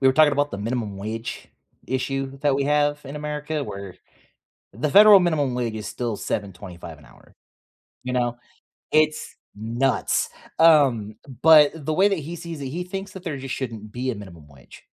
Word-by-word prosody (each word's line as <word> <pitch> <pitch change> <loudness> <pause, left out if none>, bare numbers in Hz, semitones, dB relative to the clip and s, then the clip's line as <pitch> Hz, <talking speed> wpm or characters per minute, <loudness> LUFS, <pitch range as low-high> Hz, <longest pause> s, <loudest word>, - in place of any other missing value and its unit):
we 135 - +3
were 130 - +4
talking 155 0 +5
about 145 +1 0
the 100 - -5
minimum 110 -1 -3
wage 110 +3 -6 0.4
issue 135 +1 -3
that 145 -1 +1
we 140 0 0
have 145 0 +1
in 140 +2 -7
America 150 0 -4
where 100 -2 -8 0.8
the 130 +8 -2
federal 210 +2 +9
minimum 150 -7 0
wage 120 -3 -2
is 105 -1 -6
still 120 -4 -3
7.25 90 -6 -6
an 70 - -18
hour. - - -21 0.7
You 125 - -4
know, 120 -1 0 0.6
it's 155 0 +1 0.2
nuts, 115 +4 0 0.3
um, 135 -10 +4 0.3
but 155 -2 +7
the 155 - -1
way 190 +5 +4
that 195 -3 -1
he 160 +3 -6
sees 170 -2 -7
it, 140 - -5
he 175 +6 -4
thinks 195 +2 -6
that 190 -2 -10
there, 160 -5 -3
just, 135 -1 -5
shouldn't 110 -5 -6
be 130 +1 -2
a - - -3
minimum 90 -7 -11
wage. 70 -4 -17
135 Hz, 180 wpm, -23 LUFS, 110-150 Hz, 0.8 s, federal